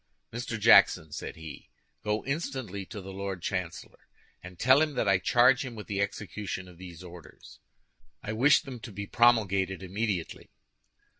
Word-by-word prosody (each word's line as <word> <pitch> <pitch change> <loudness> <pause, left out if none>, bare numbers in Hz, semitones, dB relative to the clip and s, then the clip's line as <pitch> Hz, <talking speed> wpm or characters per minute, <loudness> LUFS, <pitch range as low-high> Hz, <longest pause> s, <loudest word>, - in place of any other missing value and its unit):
"Mr. 120 -1 -4
Jackson," 100 -7 +5
said - - -6
he, 80 -2 -10 0.3
"go 105 0 -1
instantly 130 - -4
to 105 - -8
the 95 +1 -9
Lord 95 -2 -5
Chancellor, 90 -3 -5 0.3
and 90 -1 -11
tell 130 - +5
him 155 -2 0
that 110 - 0
I 95 -2 +4
charge 125 +7 +4
him 125 -3 -7
with 105 - -8
the 100 -2 -2
execution 100 -2 -4
of 90 -1 -15
these 90 -2 -10
orders. 90 -2 -13 0.6
I 110 - -4
wish 135 +6 +5
them 130 -3 -8
to 115 0 -9
be 100 +1 -6
promulgated 100 -5 +2
immediately." 95 -2 -3
100 Hz, 160 wpm, -28 LUFS, 95-120 Hz, 0.6 s, Jackson